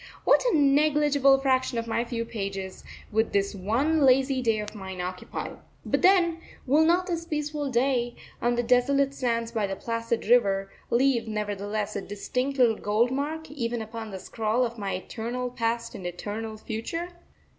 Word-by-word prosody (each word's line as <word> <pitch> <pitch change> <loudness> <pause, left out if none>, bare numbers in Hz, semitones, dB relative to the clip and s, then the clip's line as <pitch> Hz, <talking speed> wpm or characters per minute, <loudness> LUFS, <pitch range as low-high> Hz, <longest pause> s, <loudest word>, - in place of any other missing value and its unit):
What - - +5
a 325 - +3
negligible 290 -1 +4
fraction 260 -2 +1
of 230 - -1
my 230 +1 0
few 235 -1 -3
pages 195 -4 -5 0.3
would 220 +1 +1
this 200 +1 +1
one 240 +12 +1
lazy 265 0 +4
day 225 -3 +2
of 210 0 -5
mine 190 -3 -7
occupy! 180 +1 -5 0.3
But - - 0
then, 350 -3 +4 0.3
will 290 +4 +4
not 350 +3 +3
this 340 -3 -2
peaceful 300 -2 -2
day, 245 -1 +1 0.3
on 240 0 +2
the 240 - 0
desolate 275 +3 +3
sands 230 -3 -1
by 220 -3 0
the 195 - -3
placid 230 +2 -2
river, 195 -4 +3 0.2
leave 245 -1 +2
nevertheless 210 0 -3
a - - -2
distinct 230 +8 -3
little 235 -4 +4
gold 220 +4 +1
mark 305 +4 -3
even 240 -4 -2
upon 220 0 -6
the 195 - -6
scroll 225 +5 0
of 235 -1 -6
my 200 -1 -2
eternal 240 +6 -4
past 230 -1 -2
and 180 - -6
eternal 215 +5 -5
future? 230 +12 -4
235 Hz, 165 wpm, -27 LUFS, 215-275 Hz, 0.3 s, What